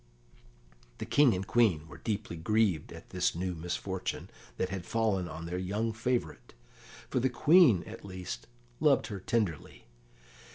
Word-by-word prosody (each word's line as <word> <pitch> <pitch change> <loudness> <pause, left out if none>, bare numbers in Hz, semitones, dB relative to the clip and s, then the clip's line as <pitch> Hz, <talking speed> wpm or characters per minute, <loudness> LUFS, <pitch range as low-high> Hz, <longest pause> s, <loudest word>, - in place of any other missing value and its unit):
The - - -5
King 140 -7 +4
and 95 +1 -3
Queen 95 -10 +2
were 75 0 -12
deeply 105 -5 -3
grieved 100 -1 +1
at - - -12
this - - 0
new 90 +1 -2
misfortune 90 +3 -4 0.3
that 95 - -1
had 95 -2 -4
fallen 105 -4 0
on 80 +1 -7
their 90 +2 -3
young 105 +5 -1
favourite, 120 - -2 0.6
for - - +2
the 130 +2 +2
Queen, 140 - +5
at - - -10
least, 90 -11 -7 0.3
loved - - +4
her 100 - -5
tenderly. 105 - -2
95 Hz, 150 wpm, -31 LUFS, 90-115 Hz, 0.6 s, Queen